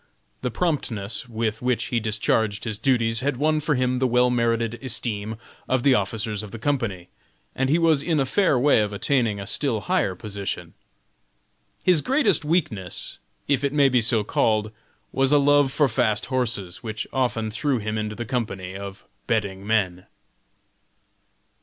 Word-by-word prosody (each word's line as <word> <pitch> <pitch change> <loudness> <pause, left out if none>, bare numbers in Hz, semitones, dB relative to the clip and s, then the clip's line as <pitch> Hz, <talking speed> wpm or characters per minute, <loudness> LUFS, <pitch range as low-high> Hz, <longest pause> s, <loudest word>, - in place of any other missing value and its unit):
The 125 - -1
promptness 120 - -2
with 110 -1 -2
which 125 -1 0
he 120 - +3
discharged 110 -1 0
his 110 -2 -4
duties 115 -4 +1
had 140 0 -1
won 155 +2 +2
for 150 0 0
him 125 0 +1
the 130 - +2
well 125 0 +3
merited 115 -1 0
esteem 110 -4 -1 0.3
of 130 -2 +1
the 140 - +5
officers 110 -4 -1
of 105 - -7
the 115 - -8
company, 110 -9 -2 0.4
and 135 0 0
he 155 - +4
was 165 -4 +3
in 160 0 0
a 135 - +2
fair 165 0 +2
way 130 -2 +4
of 105 -1 -2
attaining 110 0 +1
a 100 - -5
still 115 0 0
higher 95 0 0
position. 100 0 -5 1.1
His 180 -5 +4
greatest 230 - +2
weakness 150 - -2 0.3
if 140 -1 +1
it 140 0 0
may 140 -2 +5
be 125 -2 +3
so 115 -1 +2
called 110 0 +1 0.4
was 135 0 +2
a 145 - +6
love 145 -1 +4
for 145 +1 +3
fast 110 -3 +1
horses, 115 -8 -2
which 110 -1 -4
often 120 -4 0
threw 130 +4 0
him 110 -1 -3
into 105 0 -3
the 120 +3 -5
company 100 -6 -3
of 100 0 -8 0.2
betting 100 -3 -1
men. 95 -5 0
115 Hz, 165 wpm, -24 LUFS, 105-135 Hz, 1.1 s, a